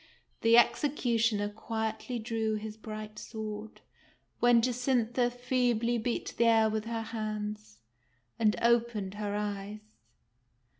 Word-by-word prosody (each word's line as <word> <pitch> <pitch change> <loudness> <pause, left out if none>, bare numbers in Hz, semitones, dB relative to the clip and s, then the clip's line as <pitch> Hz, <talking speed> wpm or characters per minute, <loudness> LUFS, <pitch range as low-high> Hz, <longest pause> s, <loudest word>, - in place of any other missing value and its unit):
The 230 +1 +6
executioner 235 -5 +2
quietly 220 +3 -3
drew 220 -1 -1
his 215 0 -5
bright 215 -1 -7
sword, 215 -1 -7 0.6
when 240 -1 +6
Jacintha 245 -1 +1
feebly 245 -1 0
beat 235 +2 -2
the 235 - +4
air 225 -1 +5
with 215 0 -2
her 230 -1 -3
hands, 215 - -5 0.6
and 215 -2 +3
opened 235 -4 +2
her 205 -1 -3
eyes. 210 +1 -5
220 Hz, 110 wpm, -30 LUFS, 215-235 Hz, 0.6 s, The